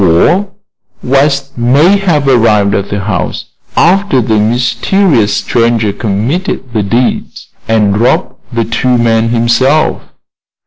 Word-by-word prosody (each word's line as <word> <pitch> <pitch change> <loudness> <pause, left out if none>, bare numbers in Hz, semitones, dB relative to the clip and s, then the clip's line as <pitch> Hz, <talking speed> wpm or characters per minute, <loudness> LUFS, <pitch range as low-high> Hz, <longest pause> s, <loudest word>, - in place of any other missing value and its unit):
Or 135 - +2 0.5
West 140 0 0
may 145 +11 +3
have 160 -8 0
arrived 110 -6 +2
at 100 - -2
the 100 0 -3
house 95 -4 -3 0.3
after 185 -4 +2
the 110 -2 0
mysterious 120 - +1
stranger 115 -3 0
committed 120 - -3
the 110 - 0
deed, 115 +5 -1 0.4
and 105 -3 +1
robbed 120 - 0 0.2
the 115 -2 -1
two 125 +2 0
men 115 -1 +1
himself." 120 +6 +1
120 Hz, 120 wpm, -10 LUFS, 110-140 Hz, 0.5 s, may